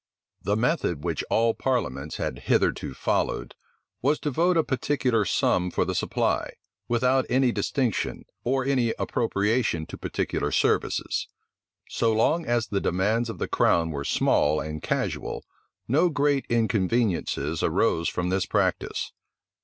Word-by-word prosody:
The 100 - 0
method 110 - 0
which - - -1
all 115 0 +3
parliaments 75 - -2
had 65 - -3
hitherto 65 - +1
followed, - - -1 0.5
was 145 +4 +2
to 150 - -1
vote 170 +5 +2
a 160 - +4
particular 130 -5 0
sum 90 0 +1
for - - 0
the - - -2
supply, - - -1 0.3
without 125 +2 +2
any 130 0 +3
distinction, 125 -3 -1 0.2
or 130 +1 0
any 125 -4 +1
appropriation 105 -6 0
to - - -9
particular - - -2
services. - - 0 0.6
So 115 - +1
long 155 +10 +2
as 120 -1 +1
the 100 -2 -2
demands 110 +6 +1
of 115 - -5
the - - -2
crown 80 -1 +2
were 70 -2 -4
small 75 +1 +2
and 75 0 -5
casual, - - -2 0.4
no 155 +9 +3
great 145 -2 +1
inconveniencies 110 -3 0
arose 85 +1 +1
from 90 0 -2
this 95 0 0
practice. - - -1
115 Hz, 140 wpm, -26 LUFS, 90-130 Hz, 0.6 s, a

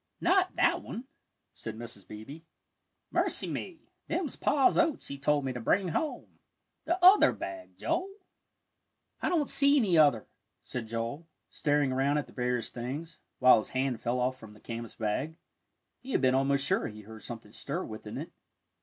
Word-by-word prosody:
"Not 370 +1 +3
that - - +3
one," 235 - -6 0.5
said 110 -1 -7
Mrs. 115 -5 -8
Beebe. 110 +9 -9 0.7
"Mercy - - +1
me, 340 -4 -5 0.3
them's 330 -3 -2
Pa's 275 -3 +3
oats 330 -3 +1
he 140 - -6
told 145 0 +2
me 130 - -1
to 125 - -5
bring 185 - +2
home 300 - -3 0.5
the 345 - +1
other 390 +3 +8
bag, 330 -1 -7
Joel." 375 - -1 1.1
"I - - +1
don't 315 -5 +1
see 280 +1 +4
any 190 - +4
other," 140 -8 +5 0.4
said 120 -3 -5
Joel, 115 +8 -4 0.2
staring 145 -2 +1
around 135 +3 +2
at 150 - -1
the - - -17
various 125 -2 -1
things, 145 +7 -6 0.2
while 125 0 +7
his 110 - -3
hand 130 -3 0
fell 120 +2 0
off 130 +1 0
from 110 -2 -12
the 105 - -16
canvas 115 -1 -7
bag. 125 +9 -2 0.6
He 260 0 -7
had - - +2
been 130 -1 +4
almost 140 +1 +2
sure - - +1
he 105 0 -9
heard 110 +1 -11
something 115 -2 -8
stir - - -4
within - - -7
it. - - -6
135 Hz, 170 wpm, -30 LUFS, -, 1.1 s, other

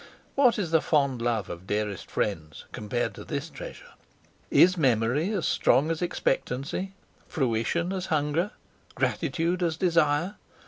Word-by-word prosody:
What 260 -4 +4
is 180 -6 -2
the 160 -1 +4
fond 140 -5 +1
love 115 -4 0
of 85 +2 -8
dearest 105 -3 -2
friends 80 -7 -3
compared 120 +3 -2
to - - -9
this 145 +1 -4
treasure? - - -9 0.6
Is 185 +1 +6
memory 130 - +2
as 195 -6 -1
strong 150 +5 +3
as 165 - -3
expectancy? 170 +2 -1 0.3
fruition, 145 - 0
as 190 -1 -3
hunger? 155 +3 +1 0.5
gratitude, 175 +2 0
as 165 -2 0
desire? 170 +1 +2
155 Hz, 135 wpm, -27 LUFS, 120-180 Hz, 0.6 s, Is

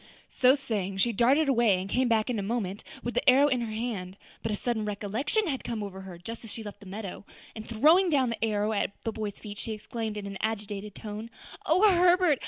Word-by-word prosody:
So 255 +1 +5
saying, 210 -9 -3
she 235 +5 +3
darted 265 +8 +4
away, 235 -8 +4
and 185 - -4
came 250 +5 +1
back 225 -2 +2
in 230 - -1
a - - -1
moment 200 -2 -2 0.2
with 240 - -3
the - - +3
arrow 275 +3 +6
in 255 -4 +1
her 230 -2 -3
hand. 215 -5 -4 0.2
But 225 - -2
a - - 0
sudden 230 0 -1
recollection 210 - -1
had 275 -7 -2
come 225 -3 -3
over 190 -1 -7
her 190 -2 -9
just 225 +7 -8
as 225 - -8
she 225 - -6
left 205 -1 -8
the 200 - -13
meadow, 200 0 -6 0.3
and 220 0 -8
throwing 315 - +5
down 265 -6 +2
the 230 - -4
arrow 215 -1 +1
at 200 -1 -1
the 225 - -1
boy's 210 -2 -5
feet, 205 -2 -8
she 225 - -4
exclaimed 215 0 -5
in 205 - -5
an 195 -1 -6
agitated 210 -2 -3
tone, 215 +1 -6 0.4
"O 370 +7 +5
Herbert! 355 -5 +4
220 Hz, 230 wpm, -28 LUFS, 205-250 Hz, 0.4 s, arrow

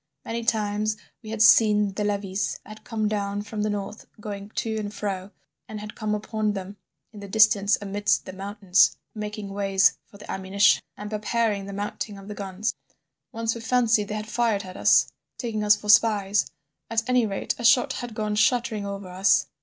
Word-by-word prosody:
Many 230 +1 -3
times 215 -1 0 0.2
we 215 - -10
had 220 0 +2
seen 210 -3 +5
the 210 - -2
levies 200 -2 -1
that - - -15
had 215 0 -11
come 220 -2 -2
down 205 -1 -2
from 210 0 -5
the 210 - 0
north 205 +1 -5
going 205 -1 -7
to 220 -1 -2
and 205 -1 -4
fro, 195 -2 -4 0.4
and 215 - -7
had 210 +1 -8
come 215 -1 -2
upon 215 0 -2
them 195 +1 -7 0.4
in 210 - -10
the 200 - -8
distance 210 0 +4
amidst 205 0 0
the 185 - -8
mountains 195 -1 +2 0.2
making 210 -1 -5
ways 195 -1 +2
for 200 - -16
the 205 - -9
ammunition 190 +2 +3 0.2
and 210 +1 -7
preparing 210 -1 -1
the 200 - -7
mounting 205 +1 -4
of 195 0 -12
the 210 - -5
guns. 200 +1 -3 0.6
Once 225 0 -1
we 235 - -7
fancied 230 -3 +2
they 210 - -4
had 215 0 -5
fired 225 -3 0
at 185 -1 -10
us, - - +5 0.3
taking 220 -4 -3
us 210 0 +6
for 210 0 -10
spies—at 210 -1 +1
any 250 -3 +3
rate 195 -1 -2
a - - -5
shot 240 +1 +5
had 245 -3 -6
gone 215 -1 -2
shuddering 220 -1 +1
over 200 -1 -6
us. 185 -5 +3
210 Hz, 190 wpm, -25 LUFS, 200-220 Hz, 0.6 s, us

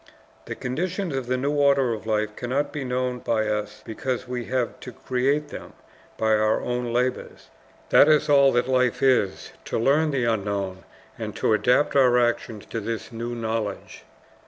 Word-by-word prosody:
The - - -5
conditions 175 +5 -3
of 130 -2 -3
the 130 +1 0
new 140 +3 -1
order 140 -4 +3
of 110 0 -7
life 105 -1 -1
cannot 140 +4 -2
be 150 -3 -3
known 125 0 -2
by 110 -3 0
us 105 -1 -3
because 125 +3 -4
we 125 -1 -4
have 125 0 -2
to 125 - -9
create 135 +5 -1
them - - -9 0.4
by 110 - 0
our 110 0 +2
own 125 -1 -3
labors. 125 +2 -2 0.4
That 150 - +7
is 150 -1 +4
all 140 -2 +5
that 120 +1 +1
life 125 0 +1
is, 125 -8 +1
to - - -2
learn 145 +7 +3
the 135 -4 0
unknown, 100 -4 -2 0.3
and - - -5
to - - +1
adapt 125 +7 +2
our 125 -3 +5
actions 120 -3 -1
to 115 - -2
this 115 +2 -5
new 120 +1 -5
knowledge. 110 -3 -4
125 Hz, 175 wpm, -24 LUFS, 110-135 Hz, 0.4 s, That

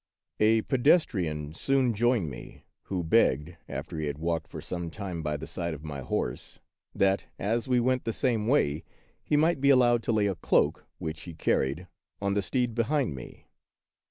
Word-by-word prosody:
A 110 +1 +4
PEDESTRIAN 95 - +2
sooH 130 +7 +1
joined 115 -4 +2
me, - - -11 0.2
who 90 -3 -2
begged, 80 0 +2
after 80 - -5
he 75 - -2
had 70 -1 -3
walked 80 0 -2
for - - -8
some 85 -2 -4
time 90 -2 -5
by 75 -1 -2
the 75 - -7
side 85 -2 -3
of 75 - -12
my 75 -3 -5
horse, 60 -1 -3 0.4
that, 95 0 +2
as 115 +5 -1
we 125 -1 +3
went 130 +1 +1
the 115 - 0
same 115 -2 0
way, 80 - +2 0.4
he 150 - +1
might 160 -1 +2
be 140 - +4
allowed 120 -3 +5
to 115 - -1
lay 105 -2 +2
a 100 - +1
cloak, 85 - +1
which 80 0 -5
he 85 -2 -8
car - - +2
ried, 75 +8 -3 0.3
on 100 0 0
the 100 - +1
steed 125 +4 -1
behind 120 - 0
me. 65 -3 -10
100 Hz, 185 wpm, -28 LUFS, 80-120 Hz, 0.4 s, allowed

